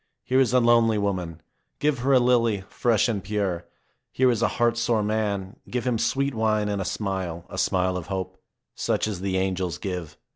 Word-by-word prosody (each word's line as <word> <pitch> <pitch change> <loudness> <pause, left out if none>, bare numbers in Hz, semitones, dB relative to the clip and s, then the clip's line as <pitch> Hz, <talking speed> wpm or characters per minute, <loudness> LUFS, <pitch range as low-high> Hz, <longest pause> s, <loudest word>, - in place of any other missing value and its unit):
Here 130 +1 +2
is 130 -4 +3
a 125 - +5
lonely 115 -2 +4
woman. 90 -6 -2 0.3
Give 150 -3 +1
her 135 +3 +1
a - - +7
lily, 115 -4 +2
fresh 115 -2 +2
and 105 -5 -2
pure. 95 -4 -2 0.4
Here 130 -1 +3
is 115 -2 -1
a - - +4
heart 120 -1 +3
sore 115 -2 +1
man. 105 -2 -2
Give 125 -2 -2
him 120 -3 +1
sweet 140 +3 0
wine 110 -2 +1
and 100 -1 -1
a - - -3
smile, 95 -5 -3
a - - -4
smile 90 0 +1
of 90 - -6
hope, 95 -3 -5 0.3
such - - 0
as 100 -4 -4
the 95 -1 -1
angels 95 -4 -1
give. 90 -5 -5
105 Hz, 195 wpm, -25 LUFS, 95-120 Hz, 0.4 s, a